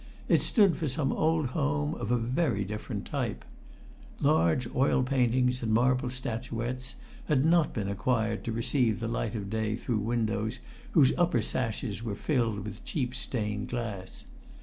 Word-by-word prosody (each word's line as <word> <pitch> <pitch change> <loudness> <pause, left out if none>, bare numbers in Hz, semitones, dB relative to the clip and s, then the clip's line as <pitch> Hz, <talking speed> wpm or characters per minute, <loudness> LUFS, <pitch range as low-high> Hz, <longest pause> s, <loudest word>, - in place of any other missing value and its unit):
It - - +4
stood 200 - +4
for 160 - -1
some 135 +1 0
old 155 -3 +1
home 75 - 0
of - - -4
very 120 - +1
different 105 +2 -5
type. - - -3 0.7
Large 85 +10 +3
oil 130 0 +3
paintings 125 -1 +2
and 115 -2 -1
marble 125 +2 +3
statuettes 125 0 -4 0.3
had 145 -2 +3
not 165 -1 +4
been 105 -4 -3
acquired 110 +3 0
to 115 - -1
receive 115 0 +1
the 115 - -2
light 115 -1 -2
of 100 -3 -4
day 110 -1 0
through 120 -1 -1
windows 110 +1 -1 0.4
whose 140 -6 +6
upper 165 -10 +3
sashes 115 -3 -2
were 110 -3 -3
filled 115 -7 0
with 105 - -8
cheap 125 -5 -2
stained 105 -5 -2
glass. 105 -6 -5
120 Hz, 150 wpm, -29 LUFS, 110-130 Hz, 0.7 s, whose